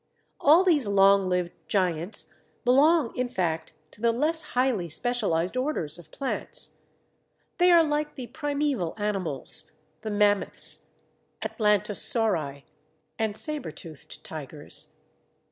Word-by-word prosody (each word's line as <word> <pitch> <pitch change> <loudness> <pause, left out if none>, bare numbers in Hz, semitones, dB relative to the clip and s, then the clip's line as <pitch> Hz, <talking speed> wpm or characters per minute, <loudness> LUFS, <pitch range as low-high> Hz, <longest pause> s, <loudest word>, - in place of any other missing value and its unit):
All 315 +6 +6
these 310 - +3
long 195 -1 +4
lived 180 -1 0 0.2
giants 180 -1 -1 0.3
belong 280 +2 +4
in 250 0 -1
fact 170 -8 -2 0.2
to 210 - -15
the 235 0 +3
less 305 +7 0 0.2
highly 245 -9 +1
specialized 195 -3 0
orders 255 - -2
of 175 - -15
plants. 275 - -4 0.8
They 355 +1 +5
are 340 -2 +7
like 300 -1 -2
the 255 - -6
primeval 285 - -2
animals, 195 - -2 0.3
the 215 - -5
Mammoths, 205 -1 +3 0.6
Atlantosauri, 210 - 0 0.6
and 220 -2 -1
Sabretoothed 215 - -4
Tigers. - - -4
215 Hz, 110 wpm, -26 LUFS, 180-280 Hz, 0.8 s, are